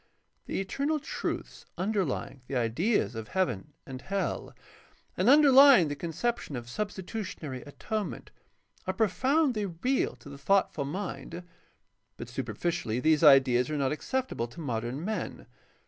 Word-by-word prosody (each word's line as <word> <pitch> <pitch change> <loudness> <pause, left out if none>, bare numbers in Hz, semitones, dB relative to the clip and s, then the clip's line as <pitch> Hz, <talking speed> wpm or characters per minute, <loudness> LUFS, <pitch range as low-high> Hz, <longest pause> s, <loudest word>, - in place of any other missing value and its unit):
The - - -2
eternal 280 +11 -1
truths 300 - -5
underlying 185 -8 -2
the 140 - -4
ideas 125 - +1
of 110 -1 -6
heaven 150 - -2
and 130 -1 -8
hell 195 0 -3 0.6
and - - +2
underlying 275 - +8
the 145 - -3
conception 170 - -3
of 120 -1 -6
substitutionary 185 - -5
atonement 205 - -5 0.6
are - - -1
profoundly 240 - +2
real 190 - -1
to 120 +2 -16
the 140 0 -10
thoughtful 175 -3 +1
mind, 170 0 -5 0.7
but - - -7
superficially 165 -10 -2
these 155 +3 +3
ideas 135 -3 +6
are 155 - -2
not 135 -2 +1
acceptable 250 - -2
to 120 - -13
modern 125 +1 -3
men. 215 +1 -4
170 Hz, 130 wpm, -29 LUFS, 135-215 Hz, 0.7 s, underlying